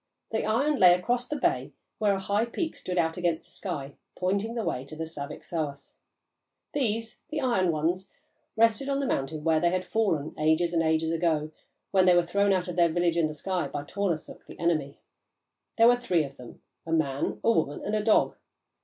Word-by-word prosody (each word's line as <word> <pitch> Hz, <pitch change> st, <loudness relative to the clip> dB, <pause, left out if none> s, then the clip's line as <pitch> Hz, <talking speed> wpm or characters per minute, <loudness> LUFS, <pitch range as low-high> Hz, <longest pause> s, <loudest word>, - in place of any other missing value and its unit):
The 220 Hz, -, 0 dB
iron 275 Hz, +7 st, +1 dB
lay 180 Hz, -1 st, +8 dB
across 240 Hz, +7 st, -1 dB
the 300 Hz, -, -3 dB
bay -, -, 0 dB, 0.3 s
where 205 Hz, -2 st, +3 dB
a -, -, -3 dB
high 205 Hz, +3 st, 0 dB
peak 320 Hz, +7 st, -3 dB
stood 180 Hz, 0 st, -5 dB
out 165 Hz, 0 st, +1 dB
against 170 Hz, -2 st, 0 dB
the -, -, -15 dB
sky, 145 Hz, -8 st, -5 dB, 0.2 s
pointing 200 Hz, +5 st, -1 dB
the 230 Hz, -, -1 dB
way 125 Hz, -, -2 dB
to 140 Hz, +3 st, -10 dB
the 160 Hz, -, -4 dB
Saviksoahs. 145 Hz, -1 st, -5 dB, 0.8 s
These 225 Hz, -5 st, -1 dB
the 305 Hz, -1 st, -2 dB
"Iron 200 Hz, -10 st, +2 dB
Ones" 170 Hz, +5 st, -1 dB, 0.5 s
rested 230 Hz, +4 st, +3 dB
on 275 Hz, 0 st, +1 dB
the 280 Hz, -, -1 dB
mountain 150 Hz, -, -2 dB
where 160 Hz, -1 st, +3 dB
they 175 Hz, +1 st, +3 dB
had 185 Hz, +1 st, -1 dB
fallen, 180 Hz, -11 st, 0 dB
ages 160 Hz, +3 st, +2 dB
and 165 Hz, -, +3 dB
ages 160 Hz, 0 st, +1 dB
ago, 160 Hz, -2 st, 0 dB, 0.4 s
when 190 Hz, -2 st, +4 dB
they 180 Hz, -, +7 dB
were 175 Hz, -1 st, +4 dB
thrown 200 Hz, +3 st, +2 dB
out 185 Hz, -1 st, +1 dB
of 180 Hz, -1 st, -5 dB
their 170 Hz, -1 st, +5 dB
village 170 Hz, 0 st, +1 dB
in 165 Hz, -2 st, +2 dB
the 155 Hz, -, -7 dB
sky 180 Hz, +3 st, -2 dB
by 145 Hz, -, -5 dB
Tornarsuk, 180 Hz, -1 st, -3 dB
the -, -, -11 dB
enemy. 155 Hz, -5 st, 0 dB, 0.8 s
There 230 Hz, 0 st, +7 dB
were 245 Hz, 0 st, +6 dB
three 185 Hz, -10 st, +1 dB
of 140 Hz, -1 st, -8 dB
them, 125 Hz, -1 st, -12 dB, 0.2 s
a 165 Hz, -, -7 dB
man, 145 Hz, -4 st, 0 dB
a 230 Hz, -, +5 dB
woman, 150 Hz, -9 st, 0 dB
and 205 Hz, -, -2 dB
a 215 Hz, -, +1 dB
dog. 215 Hz, 0 st, +3 dB
175 Hz, 205 wpm, -27 LUFS, 160-215 Hz, 0.8 s, lay